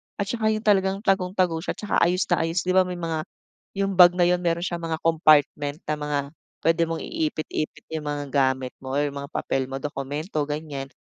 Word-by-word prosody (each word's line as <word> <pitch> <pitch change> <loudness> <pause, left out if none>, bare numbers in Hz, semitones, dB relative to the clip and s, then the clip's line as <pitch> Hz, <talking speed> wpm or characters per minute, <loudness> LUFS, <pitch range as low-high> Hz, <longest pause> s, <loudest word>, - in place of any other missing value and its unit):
At 200 -1 -2
saka 225 -2 0
yung 215 0 0
talagang 195 0 +2
tagong-tago 185 -4 +1
siya 165 - -4
'tsaka 210 - 0
ayos 180 +3 +3
na 175 - +4
ayos, 165 +1 -1
di 185 - 0
ba 185 0 +4
may 180 - -4
mga 165 -2 -3 0.5
yung 195 0 0
bag 180 -1 +9
na 175 - +5
yun 180 0 +2
mayro'n 170 0 0
siyang 175 -1 -4
mga 165 -1 -2
compartment 150 -2 +3
na 150 - 0
mga 150 -1 -2 0.5
puwede 165 0 +3
mong 165 0 -1
iipit-ipit 305 - -3
yung 150 -2 -3
mga 145 0 -3
gamit 130 -2 +1
mo 130 - -7
or 145 - +2
mga 140 0 -6
papel 135 -4 -2
mo 135 - -3
dokumento 145 +3 -3
ganyan. 145 -3 -5
165 Hz, 200 wpm, -24 LUFS, 145-185 Hz, 0.5 s, bag